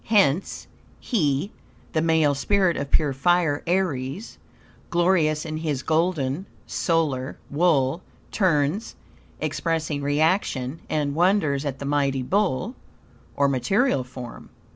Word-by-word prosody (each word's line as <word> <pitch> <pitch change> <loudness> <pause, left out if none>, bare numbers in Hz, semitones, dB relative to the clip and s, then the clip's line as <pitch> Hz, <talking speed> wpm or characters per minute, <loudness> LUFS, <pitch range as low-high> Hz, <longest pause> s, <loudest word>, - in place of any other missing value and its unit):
Hence 195 -6 +2 0.3
"He 155 - 0 0.4
(the 155 - +2
male 160 -3 +3
spirit 185 +5 +2
of 140 0 -3
pure 145 -2 +2
fire, 160 +1 +2
Aries), 175 - -2 0.5
glorious 170 -3 +2
in 155 -1 -4
his 150 -4 -2
golden 160 0 0 0.2
(solar) 150 -6 -1
wool, 150 -1 +2 0.3
turns 175 +1 +1 0.4
(expressing 160 -3 -2
reaction) 145 -2 0
and 145 -2 0
wonders 160 -4 +2
at 140 -2 -3
the 140 - -6
mighty 140 -2 +1
bull 200 - 0 0.6
(or 140 0 +3
material 140 - +1
form)." 125 -1 -10
155 Hz, 110 wpm, -24 LUFS, 140-180 Hz, 0.6 s, male